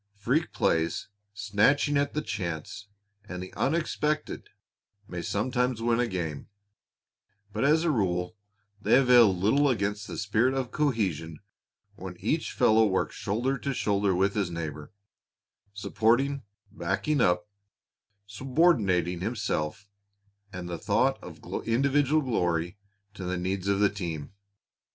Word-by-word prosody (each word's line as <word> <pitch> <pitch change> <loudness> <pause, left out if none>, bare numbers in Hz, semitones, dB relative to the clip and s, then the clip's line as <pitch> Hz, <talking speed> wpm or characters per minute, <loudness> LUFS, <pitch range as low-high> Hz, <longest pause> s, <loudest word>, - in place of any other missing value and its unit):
Freak 125 +10 0
plays, 80 +2 0 0.2
snatching 105 +9 +2
at 145 +1 0
chance 90 +2 -5 0.4
and 90 0 -5
the 95 - -10
unexpected, 155 0 -1 0.6
may 90 -2 -5
sometimes 125 +5 -1
win 115 +1 +1
a 125 - +2
game, 80 -7 -4 1.0
but 110 - -1
as 155 +3 +4
a 170 - +2
rule 90 -5 -1 0.5
they - - +4
avail 125 -5 +6
little 110 +11 +2
against 105 -3 -1
the - - -6
spirit 110 +5 +1
of 130 -2 -2
cohesion 95 - -1 0.6
when - - -8
each - - -1
fellow 110 +1 +4
works 95 -3 0
shoulder 125 +7 -1
to 140 +1 -3
shoulder 100 -3 +1
with 95 +2 +2
his 100 -4 -1
neighbor, 80 -2 -6 0.8
supporting, 120 +7 +1 0.3
backing 150 -3 -1
up, 90 0 +2 0.8
subordinating 100 - +1
himself 100 -3 -3 0.6
and 90 -2 -6
the 85 -1 -5
thought - - +1
of - - -11 0.2
individual 140 +5 +2
glory 90 -7 0 0.4
to 100 - -8
the 90 0 -2
needs 95 +1 -2
of 100 0 +2
the 105 - +5
team. 85 -6 -5
105 Hz, 125 wpm, -28 LUFS, 90-130 Hz, 1.0 s, avail